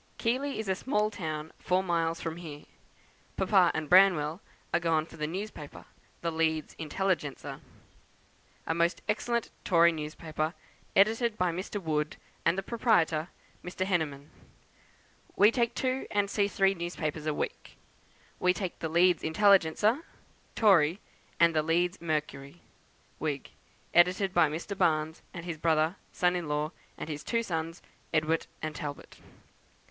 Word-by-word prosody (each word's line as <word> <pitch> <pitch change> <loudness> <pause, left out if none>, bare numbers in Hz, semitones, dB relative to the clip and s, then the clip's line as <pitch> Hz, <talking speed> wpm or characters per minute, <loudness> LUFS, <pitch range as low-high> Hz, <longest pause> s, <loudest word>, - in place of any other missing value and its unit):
Keighley 265 +4 -1
is 220 - -4
a 190 - +2
small 210 +1 0
town 155 -5 -5
four 185 +1 +1
miles 165 -2 0
from 165 0 -4
here. 155 -4 -8 0.7
Papa 190 -2 +4
and 155 -1 -2
Branwell 180 -2 +5 0.3
are - - +4
gone 165 -2 +1
for - - -14
the 150 -1 -2
newspaper, 180 -4 -7 0.4
the 170 - -1
'Leeds 160 -1 0
Intelligencer,' 165 -2 -2 1.1
a - - 0
most 170 +1 0
excellent 235 +2 -1
Tory 170 -2 +5
newspaper, 155 +1 -4 0.4
edited 220 +3 +3
by 180 -1 +1
Mr. 185 +4 -4
Wood, 155 -4 -2 0.3
and 165 +2 +2
the 195 - -1
proprietor, 175 -9 +2 0.4
Mr. 185 +1 -3
Henneman. 155 -6 -2 1.0
We 210 +2 +6
take 235 -1 0
two 260 0 -1
and 200 -1 0
see 200 -1 +2
three 195 -1 +2
newspapers 165 -3 -4
a 155 - +1
week. - - -5 0.6
We 180 0 +3
take 185 -3 -4
the 160 - -3
'Leeds 175 +2 +4
Intelligencer,' 200 - +4 0.6
Tory, 185 -5 +4 0.4
and 170 -1 +5
the 155 - +4
'Leeds 175 +4 0
Mercury,' 150 -1 -3 0.6
Whig, 145 -3 -3 0.4
edited 180 +2 +4
by 170 -4 +4
Mr. 170 +6 -5
Baines, 160 -3 +1
and 170 -1 -8
his 170 -3 -5
brother, 160 +1 +2 0.2
son 180 0 +1
in 175 -3 -3
law, 150 +1 -1 0.3
and - - -6
his 150 -2 -5
two 230 -1 0
sons, 165 -3 -4 0.3
Edward 155 0 +1 0.2
and 155 0 -2
Talbot. 145 -3 -7
170 Hz, 140 wpm, -29 LUFS, 155-195 Hz, 1.1 s, We